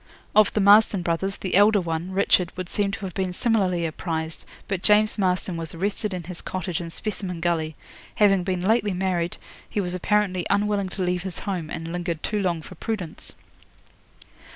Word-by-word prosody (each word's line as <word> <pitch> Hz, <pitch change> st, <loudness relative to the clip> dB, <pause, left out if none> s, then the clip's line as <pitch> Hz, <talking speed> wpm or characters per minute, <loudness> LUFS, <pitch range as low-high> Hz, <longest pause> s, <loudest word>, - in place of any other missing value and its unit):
'Of 215 Hz, -1 st, +6 dB
the -, -, +1 dB
Marston 205 Hz, -1 st, +6 dB
brothers, 175 Hz, +3 st, -1 dB
the 185 Hz, -, -4 dB
elder 205 Hz, +2 st, +6 dB
one, 165 Hz, 0 st, -3 dB
Richard, 185 Hz, -2 st, +3 dB
would 185 Hz, -1 st, -5 dB
seem 205 Hz, -1 st, 0 dB
to 200 Hz, -, -5 dB
have 185 Hz, -, -6 dB
been 190 Hz, -1 st, -1 dB
similarly 185 Hz, -4 st, +1 dB
apprised, 160 Hz, 0 st, -4 dB, 0.2 s
but 195 Hz, -3 st, -2 dB
James 210 Hz, +1 st, +4 dB
Marston 180 Hz, -2 st, 0 dB
was 165 Hz, 0 st, -6 dB
arrested 205 Hz, +4 st, -1 dB
in 180 Hz, -2 st, -4 dB
his 175 Hz, +1 st, -7 dB
cottage 180 Hz, -2 st, -3 dB
in 170 Hz, -, -6 dB
Specimen 185 Hz, -1 st, -4 dB
Gully. 165 Hz, -2 st, 0 dB, 0.4 s
Having 195 Hz, -4 st, +4 dB
been 185 Hz, -1 st, -1 dB
lately 210 Hz, 0 st, +2 dB
married, 180 Hz, -2 st, -1 dB, 0.3 s
he -, -, -2 dB
was 180 Hz, -3 st, -1 dB
apparently 185 Hz, 0 st, +1 dB
unwilling 205 Hz, -1 st, +1 dB
to 185 Hz, -, -3 dB
leave 180 Hz, 0 st, 0 dB
his 185 Hz, -2 st, -6 dB
home, 180 Hz, -6 st, -3 dB
and 165 Hz, +1 st, -5 dB
lingered 175 Hz, -2 st, -3 dB
too 210 Hz, -, -1 dB
long 175 Hz, -5 st, -1 dB
for -, -, -10 dB
prudence. 205 Hz, -8 st, -5 dB
185 Hz, 180 wpm, -24 LUFS, 170-200 Hz, 0.4 s, Of